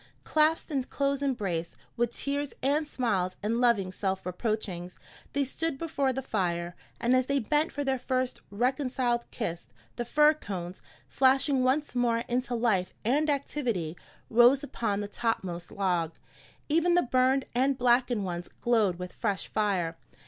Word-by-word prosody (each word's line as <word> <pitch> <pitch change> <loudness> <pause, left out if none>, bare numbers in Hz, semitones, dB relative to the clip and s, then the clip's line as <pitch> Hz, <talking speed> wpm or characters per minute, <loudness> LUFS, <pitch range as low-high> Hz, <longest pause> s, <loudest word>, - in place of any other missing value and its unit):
Clasped 315 +1 +2
in 275 -3 +1
close 280 0 -1
embrace, 195 -12 -2 0.2
with 240 -1 +1
tears 285 0 -2
and 295 +3 +2
smiles 195 -10 -1
and 230 +3 0
loving 215 -7 +3
self 190 0 -2
reproachings, 180 -2 -3 0.4
they 285 +1 +2
stood 300 +3 -2
before 280 -4 0
the 265 +1 -3
fire; 175 -6 -1 0.2
and 240 +2 +3
as 255 0 +2
they 280 - +1
bent 295 +6 +1
for 285 - -3
their 265 -2 0
first 255 0 -1
reconciled 245 +1 0
kiss, 175 -8 -4 0.3
the 240 - -1
fir 300 +5 +5
cones, 185 - -6 0.3
flashing 265 0 +3
once 275 +4 +1
more 235 -2 +1
into 245 0 -1
life 220 -6 +1
and 295 +6 +2
activity, 245 - -1 0.3
rose 245 +4 +5
upon 210 -7 -2
the 205 - -3
topmost 190 -5 -3
log. 175 -5 0 0.5
Even 335 +3 +3
the 355 - +4
burned 260 +1 +2
and 265 +2 +2
blackened 245 -3 +2
ones 175 -1 -4
glowed 220 -7 +2
with 180 0 -7
fresh 205 -5 -2
fire. 185 -6 0
240 Hz, 150 wpm, -29 LUFS, 195-275 Hz, 0.5 s, fir